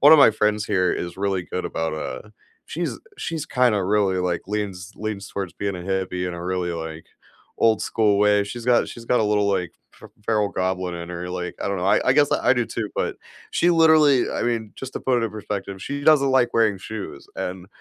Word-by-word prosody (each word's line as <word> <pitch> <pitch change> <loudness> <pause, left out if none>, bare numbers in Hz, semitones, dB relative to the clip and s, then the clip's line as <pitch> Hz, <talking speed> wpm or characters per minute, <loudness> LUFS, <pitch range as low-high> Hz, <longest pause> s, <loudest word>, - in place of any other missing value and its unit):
one 145 +3 +8
of 160 - +9
my 125 - +8
friends 105 0 +1
here 90 -3 +1
is 85 +1 -4
really 95 -2 -1
good 90 - -4
about, 80 -1 -2
uh, 80 - -5 0.4
she's, - - -3 0.2
she's, 160 -2 -3
kinda, 120 -5 +2
really, 100 -2 +2
like, 90 -2 -1
leans 100 -2 -4
leans 105 -2 -4
towards 95 -3 -4
being 100 -2 -3
a - - -7
hippie 90 -1 -2
in 90 - -5
a 85 0 -7
really, 90 -1 -1
like, 80 -1 -6 0.5
old 110 -1 +3
school 105 -3 +2
way. 105 0 +4
She's 115 +3 -7
got 125 -1 +3
she's 115 - -9
got 125 - +2
a - - +2
little, 105 -1 +2
like, 90 -3 -1 0.2
fe - - -13 0.2
feral 105 -2 +2
goblin 95 -1 -2
in 85 0 -6
her, 90 +1 -5
like, 90 -1 -4
I - - -2
don't 100 - -1
know, 90 - -1
I 100 - +4
I 130 - +7
guess 145 0 +4
I - - +3
do 120 - +1
too, 110 -3 -4
but - - -2 0.3
she 175 - +2
literally, 160 -5 +5
I - - -2
mean, 115 -3 -1
just, 135 -1 -7
to - - -3
put 125 -2 +1
it - - +2
in - - -7
perspective, 100 -2 -5
she 140 0 -4
doesn't 140 -3 +5
like 130 -2 +2
wearing 110 -4 +3
shoes, 100 -7 -7
and 90 0 -4
100 Hz, 225 wpm, -23 LUFS, 90-115 Hz, 0.5 s, of